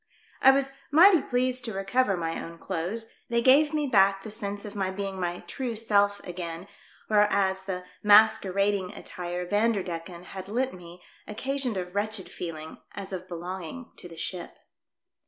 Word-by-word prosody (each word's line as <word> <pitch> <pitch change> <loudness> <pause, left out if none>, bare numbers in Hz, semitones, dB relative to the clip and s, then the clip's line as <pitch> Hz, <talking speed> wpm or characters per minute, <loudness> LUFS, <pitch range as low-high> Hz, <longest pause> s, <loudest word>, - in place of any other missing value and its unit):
I 265 - +8
was 270 0 +3 0.2
mighty 340 +2 +7
pleased 255 0 0
to 225 - -3
recover 195 +2 +1
my 165 -1 -3
own 170 0 -9
clothes; 190 +7 -3 0.2
they 235 0 +2
gave 290 +4 +6
me 305 -1 0
back 195 -5 +4
the 215 - -7
sense 205 -1 -4
of 210 0 -8
my 195 -2 -1
being 195 0 -4
my 175 -1 -2
true 235 +7 -4
self 205 -2 +2
again, 175 0 -6 0.4
whereas 200 -2 +2
the 180 -2 -4 0.2
mas 215 +1 +7
querading 195 0 -1
attire 180 0 -5
Vanderdecken 180 -4 -1
had 190 0 -8
lent 255 +5 -1
me 175 0 -12 0.2
occasioned 260 0 -2
a 180 - -2
wretched 205 +2 -2
feeling 160 -2 -7 0.2
as 195 -1 -6
of 185 0 -5
belonging 180 +7 -7
to 175 - -9
the 165 - -12
ship. 175 +1 -5
200 Hz, 160 wpm, -27 LUFS, 180-225 Hz, 0.4 s, I